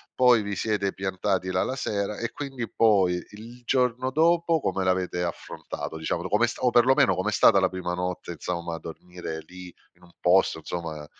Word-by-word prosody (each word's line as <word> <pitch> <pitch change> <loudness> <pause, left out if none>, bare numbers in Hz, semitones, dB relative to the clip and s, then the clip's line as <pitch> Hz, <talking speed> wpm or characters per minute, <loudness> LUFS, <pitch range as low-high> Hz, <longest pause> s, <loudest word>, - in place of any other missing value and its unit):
poi 125 -3 +5
vi 100 -1 -4
siete 100 -3 -1
piantati 95 -1 -2
là 90 0 +1
la 130 - -3
sera 105 -5 -2
e 115 - -3
quindi 135 -6 -6
poi, 95 -5 +3
il 115 +4 -12
giorno 125 0 +1
dopo, 165 +1 +2
come 95 - -1
l'avete 90 -1 0
affrontato? 85 -1 -6
Diciamolo, 85 +3 -3
com'è 115 +3 +3
sta 120 - -7
o 125 - +4
perlomeno 130 +3 +4
com'è 105 +3 -1
stata 100 +2 +6
la 95 - +3
prima 90 -1 -4
notte, 90 -1 -4
insomma, 85 0 -4
a - - -7
dormire 85 0 -8
lì 90 0 -11 0.3
in - - -26
un 85 - -18
posto, 90 -2 +3
insomma, 80 -2 -6
95 Hz, 180 wpm, -26 LUFS, 90-120 Hz, 0.3 s, stata